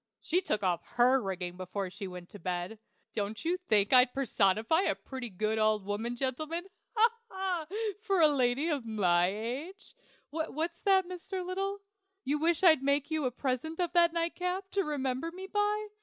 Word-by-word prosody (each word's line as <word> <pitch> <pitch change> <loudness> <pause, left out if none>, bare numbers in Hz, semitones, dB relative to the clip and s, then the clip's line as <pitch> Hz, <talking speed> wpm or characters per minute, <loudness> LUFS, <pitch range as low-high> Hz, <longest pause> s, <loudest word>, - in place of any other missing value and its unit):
She 355 +3 +1
took 215 - -1
off 175 -2 +1
her 250 +2 +5
rigging 180 -3 -4
before 185 +1 -4
she 200 +1 -6
went 180 -1 -9
to 205 - -11
bed. 180 +4 -3 0.3
Don't 215 +3 -3
you 345 +2 +2
think 215 - +2
I'd 250 -1 +6
personify 225 - +2
a - - +1
pretty 260 -3 -7
good 215 +3 -1
old 215 -2 +2
woman, 220 +4 -2
gentlemen 310 +7 -2 0.3
ha! 450 +1 +6 0.2
ha! 375 -4 -2 0.3
for 395 -4 +1
a 320 - +8
lady 270 +1 +2
of 295 -6 0
my 180 -6 +3
age? 250 - -5 0.4
What's 325 +2 -3
that, 385 -2 +4
Mr. 365 +1 -5
Little? 390 +2 -3 0.4
You 290 +3 0
wish 335 +2 +1
I'd 315 -6 +7
make 280 +2 +1
you 310 -3 0
a 250 - +1
present 265 +6 -3
of 350 -2 0
that 340 -1 +5
nightcap, 360 +3 -2
to 395 - +1
remember 280 0 -2
me 375 +2 -8
by? 415 +1 0
275 Hz, 175 wpm, -31 LUFS, 215-350 Hz, 0.4 s, a